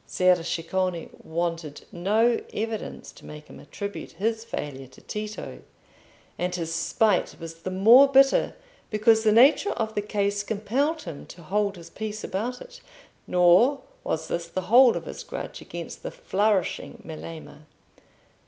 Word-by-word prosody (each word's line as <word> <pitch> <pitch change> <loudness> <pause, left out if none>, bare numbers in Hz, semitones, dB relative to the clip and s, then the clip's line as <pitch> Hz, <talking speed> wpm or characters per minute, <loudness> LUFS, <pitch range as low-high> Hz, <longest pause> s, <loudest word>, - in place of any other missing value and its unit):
Ser 185 0 +3
Ceccone 170 +1 -2
wanted 165 -2 -3
no 215 +7 +2
evidence 220 0 -5
to - - -17
make 150 0 -10
him - - -13
attribute 200 +8 -7
his 225 +2 -1
failure 140 - -6
to 130 - -18
Tito, 215 0 -6 0.8
and 180 0 -1
his 165 -2 -3
spite 195 +4 +1
was 165 0 -9
the 185 - -4
more 225 +9 +7
bitter 270 0 +4 0.3
because 220 +1 +3
the 215 - +4
nature 270 - +5
of 220 -1 -3
the 205 - -1
case 205 -1 -1
compelled 240 +10 -1
him 165 -5 -8
to 170 - -12
hold 200 +3 0
his 170 -2 -12
peace 215 0 -5
about 235 +7 -3
it. - - -12 0.5
Nor 180 +11 +4 0.2
was - - -2
this 170 0 -3
the 185 +2 -3
whole 250 -1 +7
of - - -7
his - - -7
grudge - - -7
against - - -8
the - - -5
flourishing 210 - -1
Melema. 155 -1 -9
200 Hz, 150 wpm, -26 LUFS, 170-225 Hz, 0.8 s, more